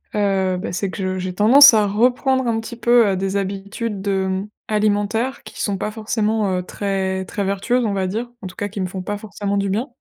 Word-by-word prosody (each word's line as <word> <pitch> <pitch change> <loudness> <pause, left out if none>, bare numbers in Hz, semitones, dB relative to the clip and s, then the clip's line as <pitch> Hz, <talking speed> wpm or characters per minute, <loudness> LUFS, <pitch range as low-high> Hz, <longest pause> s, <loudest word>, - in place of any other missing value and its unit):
heu, 190 -3 +1
beh 180 - -5
c'est 190 +2 -2
que - - -8
je 185 0 -2
j'ai 185 0 -4
tendance 255 +8 +8
à 210 -2 +3
reprendre 250 +5 +2
un 230 -1 0
petit 225 +1 -7
peu, 240 -1 +4
heu, 195 - +1
des 195 +1 -1
habitudes, 200 +1 -4
hem, 190 0 -1 0.2
alimentaires 215 +4 0
qui 215 - -9
sont 200 -2 -1
pas 210 - -3
forcément, 215 -3 -1
heu, - - -1
très 190 0 -2
très 200 +2 -4
vertueuses 230 +6 0
on 210 - 0
va 190 -1 -1
dire. 225 +6 -3
En 195 - -6
tout 180 - -12
cas 205 - -2
qui 200 0 -6
me 185 - -1
font 185 +1 -6
pas 205 +3 -4
forcément 205 -1 -4
du 200 0 0
bien. 220 +7 -1
205 Hz, 230 wpm, -20 LUFS, 190-220 Hz, 0.2 s, tendance